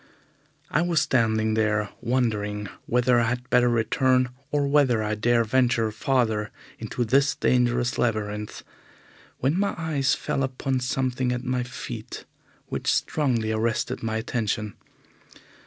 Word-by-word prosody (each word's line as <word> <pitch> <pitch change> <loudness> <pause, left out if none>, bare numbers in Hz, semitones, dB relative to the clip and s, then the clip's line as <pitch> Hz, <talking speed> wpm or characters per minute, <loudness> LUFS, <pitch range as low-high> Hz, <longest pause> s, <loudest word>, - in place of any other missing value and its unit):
I 155 - +2
was 170 -2 +2
standing 110 -3 +1
there 110 -1 +1
wondering 105 -4 -1 0.2
whether 125 0 +3
I 115 - +2
had 125 +1 -3
better 125 0 +4
return, 125 +2 +2 0.2
or 145 -1 +1
whether 135 -6 +3
I 105 0 -1
dare 115 +2 +2
venture 115 -1 +2
farther 110 -2 0 0.3
into 120 - -2
this 135 +5 +3
dangerous 125 +1 +1
labyrinth, 105 -2 -2 0.8
when 145 +8 +1
my 200 0 0
eyes 150 -4 +1
fell - - -2
upon 130 0 -1
something 125 0 -1
at 125 0 -3
my 125 -1 -1
feet 120 -2 -7 0.4
which - - -1
strongly 120 -8 0
arrested 110 +1 -1
my 110 -1 -2
attention. 110 -3 -2
120 Hz, 130 wpm, -25 LUFS, 110-130 Hz, 0.8 s, better